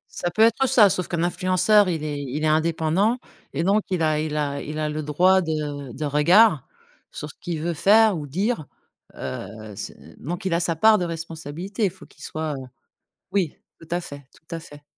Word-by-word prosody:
Ça 175 - -1
peut 215 +6 +3
être, 230 +3 +4
heu, 265 - +3
ça 220 -6 +6
sauf 180 - -2
qu'un 170 -1 -1
influenceur, 185 +3 +3
il 160 -3 -2
est 145 -2 -3
il 140 +3 -4
est - - +3
indépendant 165 +8 +2 0.3
et 150 +4 -2
donc 200 +4 +3
il 180 -3 0
a 155 -1 +2
il 150 -1 -2
a 140 -1 -1
il 150 +1 -6
a 155 0 -1
le 155 +1 -3
droit 180 +6 +3
de 150 -5 -3
de 150 +5 -4
regard 155 - +4 0.4
sur 150 - -7
ce - - -29
qu'il 170 -3 -3
veut 170 0 -1
faire 210 +5 +5
ou 150 -2 -5
dire, 185 - -1 0.5
heu, 105 +1 -7
c'est - - -10
donc 175 +6 -5
il 180 - 0
a 170 - +2
sa 170 -1 0
part 215 +6 +5
de 180 - -1
responsabilité, 165 +5 -4
faut 185 +2 -15
qu'il - - -17
soit 155 -1 -3
heu 130 - -8 0.7
oui 185 -7 0 0.2
tout 165 - -13
à 175 - +1
fait, 145 -5 -10
tout 160 - -20
à 165 - -2
fait. 145 -2 -13
165 Hz, 210 wpm, -23 LUFS, 150-185 Hz, 0.7 s, ça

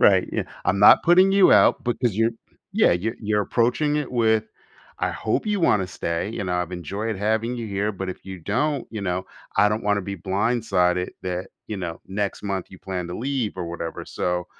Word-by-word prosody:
Right, - - +5
yeah, - - -1 0.2
"I'm 95 - +1
not 105 - +8
putting 185 +3 +5
you 195 -1 +6
out - - +5
because 120 -3 -1
you're" 115 +1 +3 0.4
Yeah, - - +4
you 110 +7 -2
you're 105 -1 +1
approaching 125 +8 +1
it 150 -3 -2
with, 110 -2 +2 0.6
"I - - +1
hope 110 - -1
you 210 -1 0
wanna 100 - +2
stay, 85 0 -3
you 105 -2 -4
know, 90 -1 -1
I've 90 0 -1
enjoyed 100 +5 -4
having 110 +4 0
you 115 -2 -4
here, 100 +1 -1
but 95 -2 -5
if 95 - -7
you 95 -1 -7
don't, 145 - -1
you 110 - -4
know, 90 -1 -2 0.3
I 105 - +5
don't 105 +2 -2
wanna 105 0 +1
be 100 +1 -5
blindsided 95 -2 +1
that, 90 0 -3 0.2
you 105 - -4
know, 85 -3 -5
next 100 +1 -3
month 95 -2 -2
you 95 - -12
plan 90 -2 -4
to 90 - -5
leave 130 -5 -2
or 90 - -3
whatever, 85 -1 -5
so, 90 0 -2
105 Hz, 205 wpm, -24 LUFS, 90-115 Hz, 0.6 s, not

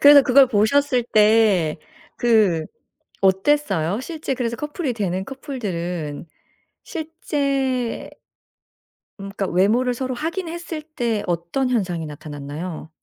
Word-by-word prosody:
그래서 285 0 +9
그걸 265 +1 +6
보셨을 250 +4 +2
때 210 -8 +4 0.4
그 210 -9 +3 0.6
어땠어요? 195 - +2
실제 315 -3 -4
그래서 235 -2 -2
커플이 295 -1 -3
되는 190 -4 -2
커플들은 180 - -5 0.6
실제 280 - -2 1.1
음 195 - -6
그러니까 195 - -1
외모를 220 +8 +2
서로 255 +1 -3
확인했을 335 +1 -4
때 240 -9 -2
어떤 175 +10 -1
현상이 180 -9 -1
나타났나요? 150 +2 -7
230 Hz, 255 characters per minute, -22 LUFS, 180-275 Hz, 1.1 s, 그래서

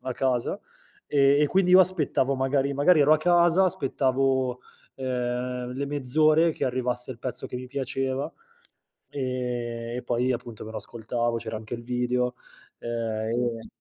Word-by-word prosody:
a 130 - -3
casa, 130 +8 0 0.5
e 140 0 +4
e - - +4
quindi 180 +3 +2
io 185 - +9
aspettavo 155 -7 +2
magari 135 +1 0
magari 145 +4 +4
ero 145 +2 +5
a 155 - +5
casa, 175 +2 +4
aspettavo, 135 -6 0 0.3
ehm, 125 -1 -3
le 140 - -2
mezz'ore 155 +4 +3
che - - -3
arrivasse 125 -1 -1
il 120 - -8
pezzo 125 -1 -4
che 125 - -6
mi 125 - -6
piaceva, 135 +2 -3 0.8
ehm, 120 -3 -3
e 125 - -4
poi 125 +2 0
appunto 120 -2 -6
me 110 - -8
lo - - -6
ascoltavo, 115 +1 -2
c'era 110 -1 -5
anche 110 0 -10
il 120 - -7
video; 125 0 0 0.5
ehm 115 0 -2
130 Hz, 150 wpm, -26 LUFS, 120-140 Hz, 0.8 s, io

